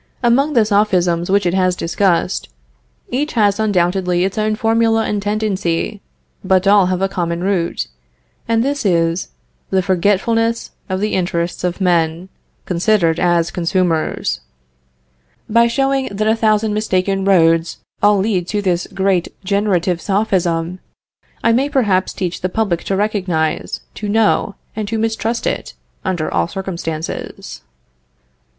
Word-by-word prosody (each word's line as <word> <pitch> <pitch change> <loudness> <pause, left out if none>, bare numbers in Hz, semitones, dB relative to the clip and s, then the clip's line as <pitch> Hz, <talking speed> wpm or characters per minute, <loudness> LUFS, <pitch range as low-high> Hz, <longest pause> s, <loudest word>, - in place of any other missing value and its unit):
Among 270 +6 +3
the 230 -5 +4
Sophisms 180 -5 +1
which 200 0 +2
it 175 - +1
has 185 -1 +2
discussed, 175 +1 0 0.6
each 290 +5 -1
has 205 -3 +2
undoubtedly 180 -3 +1
its 195 - -3
own 215 0 0
formula 225 0 +2
and 205 -1 -1
tendency, 205 -2 -1 0.4
but 185 0 +2
all 200 -2 +5
have 185 +1 -1
a - - +3
common 175 -2 -2
root; 185 -3 0 0.6
and 230 0 +2
this 285 +1 -1
is, 170 -2 +1 0.4
the 190 -1 +1
forgetfulness 205 +5 +1 0.2
of 185 +1 -2
the 215 - -1
interests 175 -2 -1
of 180 +1 -1
men, 170 -1 +1 0.4
considered 175 -2 +2
as 175 -1 +2
consumers. 170 - 0 1.1
By 235 +2 +4
showing 270 +2 0
that 210 +2 -2
a 220 - +4
thousand 215 -1 +1
mistaken 195 -2 0
roads 165 -3 +3 0.2
all 205 0 +5
lead 190 -3 0
to 210 +1 -1
this 180 -2 0
great 190 -2 0 0.2
generative 185 -3 0
Sophism, 180 -4 0 0.6
I 230 - +4
may 265 +5 +2
perhaps 205 -10 +1
teach 180 -2 -4
the 185 - -1
public 190 -4 -1
to 195 - 0
recognize, 190 -6 -1
to 210 - -5
know, 210 -1 +2 0.2
and 215 -1 -3
to 225 +2 -2
mistrust 225 +1 -1
it, - - -3 0.3
under 175 -4 -2
all - - +1
circumstances. 170 -4 -5
195 Hz, 135 wpm, -18 LUFS, 175-215 Hz, 1.1 s, all